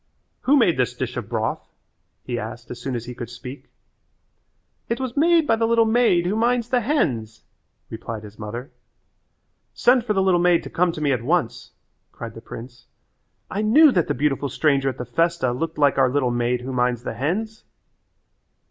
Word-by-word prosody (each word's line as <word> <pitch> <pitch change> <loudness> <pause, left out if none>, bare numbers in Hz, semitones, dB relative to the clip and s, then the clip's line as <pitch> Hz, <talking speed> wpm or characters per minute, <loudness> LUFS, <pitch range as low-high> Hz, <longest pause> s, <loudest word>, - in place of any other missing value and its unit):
"Who 285 +3 +4
made 185 - +3
this 125 -1 0
dish 125 -1 -4
of 115 -4 -5
broth?" 110 -1 -2 0.5
he 120 -1 -3
asked 115 +2 -8
as 120 0 -8
soon 130 0 -3
as 120 -1 -4
he 125 - -7
could 120 -1 -7
speak. 125 +3 -10 1.2
"It 235 - -1
was 260 -2 -4
made 330 +2 +4
by 225 - +3
the 225 0 +1
little 230 0 +4
maid 220 -6 +3
who 190 +4 0
minds 235 +1 +1
the 250 -1 +2
hens," 125 - -1 0.4
replied 110 -1 -7
his 105 0 -13
mother. 115 +5 -6 1.0
"Send 245 0 +4
for 220 -2 0
the 195 - +2
little 185 -2 +3
maid 175 -1 +3
to - - -9
come 180 0 +2
to 155 - -6
me 145 -2 +2
at 125 -4 0
once," 145 -2 -1 0.4
cried - - -8
the - - -11
prince. 120 +1 -11 0.6
"I 200 - -1
knew 280 +8 +6
that 175 -8 +1
the - - -1
beautiful 140 +1 0
stranger 140 -1 +1
at 130 - -6
the 125 - -5
festa 145 +1 0
looked 160 +7 -3
like 145 -2 +3
our 130 -1 +4
little 130 -2 +1
maid 120 +1 0
who 130 +1 -5
minds 125 -1 0
the - - -4
hens." 190 - -3
140 Hz, 190 wpm, -23 LUFS, -, 1.2 s, knew